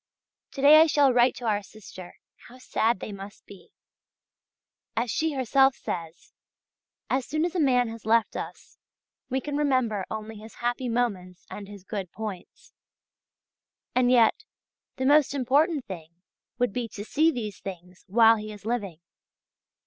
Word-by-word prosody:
To 275 - -5
day 305 +2 +9
I 325 - +6
shall 285 -4 +4
write 245 +1 +4
to 245 - -8
our 210 -2 +1
sister; 190 -3 -12 0.3
how 250 - -14
sad 230 -3 0
they - - -6
must 200 +1 -10
be! 195 -3 -15 1.3
As 235 0 0
she 320 -1 0
herself 270 0 +3
says: 165 -1 -7 0.7
"As 260 0 0
soon 310 +2 0
as 350 - -3
a 365 - -1
man 250 -5 +3
has 225 -1 -9
left 225 +1 +2
us, - - -8 0.5
we 265 +1 0
can 290 +2 -5
remember 255 -9 0
only 220 0 -6
his 220 +2 -12
happy 245 +1 -2
moments 195 -7 -2
and 200 -1 -7
his 200 -2 -11
good 195 -3 -5
points." 210 -5 -8 1.2
And 250 -1 +3
yet, 250 - +4 0.5
the 260 - -3
most 285 0 +4
important 280 +3 +1
thing 165 -5 -8 0.5
would 245 -4 0
be 245 -2 -2
to 205 - -7
see 310 +7 +3
these 215 - -4
things 180 -1 -10
while 225 +3 +5
he 215 0 -7
is 210 -1 -12
living. 205 -8 -3
230 Hz, 155 wpm, -26 LUFS, 205-265 Hz, 1.3 s, day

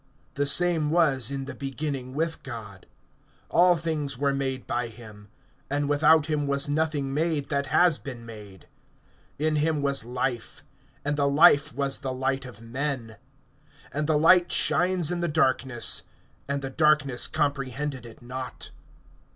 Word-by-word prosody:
(2)The 145 0 -1
same 170 -2 +3
was 150 -7 +2
in 135 -1 -4
the - - -7
beginning 135 -2 -5
with 160 +1 -2
God. 105 -7 -9 0.6
(3)All 175 0 +4
things 150 -5 -3
were 140 +1 +1
made 135 -2 -3
by 120 0 -2
him[1:3]; 110 -3 -13 0.4
and 145 +1 -1
without 150 +1 +4
him 150 -2 -1
was 140 0 +1
nothing 145 -2 -1
made 155 -2 -1
that 140 -1 -1
has 170 +4 +3
been 125 -4 -8
made. 105 -5 -12 0.7
(4)In 155 0 +1
him 150 -1 0
was 140 -4 +1
life; 125 0 -4 0.4
and 145 0 -1
the 140 -1 +2
life 145 0 +5
was 140 0 -1
the 135 -2 -4
light 135 +1 -2
of 115 -3 -12
men. 125 -2 -4 0.8
(5)And 150 +1 -2
the 155 -1 +3
light 175 +3 +5
shines 180 -2 +2
in 175 - -2
the 175 - -1
darkness; 130 -5 +1 0.5
and 140 0 -2
the 135 - -4
darkness 145 -4 +2
comprehended 140 -3 -2
it 115 0 -13
not. 125 +1 -7
140 Hz, 150 wpm, -26 LUFS, 130-150 Hz, 0.8 s, life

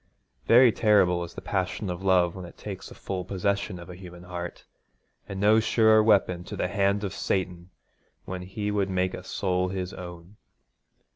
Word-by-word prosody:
Very 120 +1 +7
terrible 100 -6 +3
is 85 - -9
the - - -8
passion 95 +1 -2
of 90 +1 -6
love 90 -3 +3
when 95 - -7
it 85 - -11
takes 100 -1 -7
full 95 -2 -5
possession 100 +1 -2
of 85 0 -10
a 90 - -9
human 90 -1 -11
heart, 90 -1 -7 0.6
and 95 - -5
no 105 +2 +5
surer 110 -1 +4
weapon 100 -5 +3
to - - -6
the 90 - -1
hand 100 +1 +1
of 100 -2 -3
Satan 90 -3 -2 0.6
when 90 0 -5
he 105 +3 -4
would 100 -2 0
make 95 0 0
a - - -7
soul 90 -1 -1
his 95 -1 -4
own. 90 +2 -10
95 Hz, 175 wpm, -27 LUFS, 90-100 Hz, 0.6 s, Very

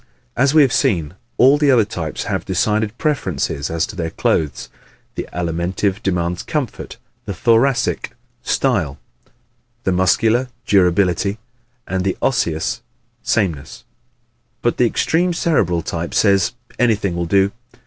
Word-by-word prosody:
As 135 +3 +3
we 155 - +8
have 130 - +1
seen, 85 - +1 0.2
all 135 +4 +5
the 150 -2 +3
other 120 -5 +5
types 80 -6 -4
have - - -2
decided 110 +1 0
preferences 95 - -1
as 80 0 0
to 105 - -10
their 85 -3 -3
clothes 75 -2 -1 0.5
the - - -6
Alimentive 90 +3 -2
demands 90 -1 -1
comfort, 145 -7 -4 0.3
the 100 - -4
Thoracic 115 +5 +1 0.3
style, 70 -2 0 0.9
the 95 - +1
Muscular 110 +7 +2 0.2
durability 95 +1 +2 0.5
and 95 0 -1
the 95 -1 -1
Osseous 85 -12 0 0.4
sameness 85 -10 -2 0.8
but 120 - +1
the 125 - +4
extreme 175 +9 +1
Cerebral 90 - +1
type 85 0 -4
says 100 -3 +3 0.3
"anything 105 -7 +1
will 85 -1 -2
do." 100 +2 +3
100 Hz, 130 wpm, -19 LUFS, 85-120 Hz, 0.9 s, we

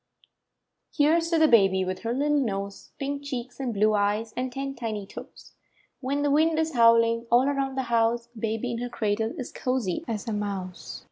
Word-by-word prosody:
Kere's 330 +3 +3
to 335 - +2
the 315 -1 +5
baby— 195 -7 +5
■ - - -3
/With 185 0 -3
her 230 - -3
little 290 +4 +1
nose, 200 -5 -3
Pink 280 0 -3
cheeks 255 -3 -6
and 260 -3 -2
blue 215 0 +2
eyes, 210 +2 0
And 255 +1 -2
ten 275 +1 -4
tiny 220 -5 -4
toes. - - -12 0.5
When 280 +2 -1
the 290 - +2
wind 315 +2 +3
is 320 0 0
howling 230 -1 +4
All 245 +3 +4
around 275 -1 -1
the 265 - +1
house, 235 0 +1
Baby 225 +2 -2
in 230 - -3
her 245 0 -3
cradle 220 0 -1
Is 255 - -5
cozy 250 -9 -2
as 220 -3 -4
a 225 - -1
mouse. 195 -3 -5
235 Hz, 195 wpm, -26 LUFS, 215-275 Hz, 0.5 s, the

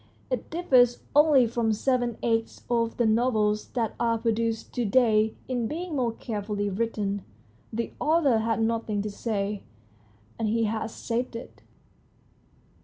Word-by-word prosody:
It 255 - -2
differs 255 -8 +3
only 295 -4 +6
from 230 -1 0
seven 245 0 0
eighths 225 -1 -1
of 230 -1 +1
the 240 - +2
novels 220 -2 +2
that 230 -3 0
are 230 -1 +2
produced 225 0 -1
to 245 - -1
day 220 -1 +3
in 245 -3 -1
being 335 +3 -4
more 245 -4 +1
carefully 205 -2 -3
written. 205 -2 -2 0.5
The 230 +1 -3
author 300 -7 +3
had 225 0 0
nothing 225 -2 -1
to 210 - -4
say, 205 -1 -2 0.8
and 225 - 0
he 230 +2 +1
has 220 0 -2
said 235 +2 -3
it." 230 - -9
230 Hz, 140 wpm, -27 LUFS, 215-245 Hz, 0.8 s, only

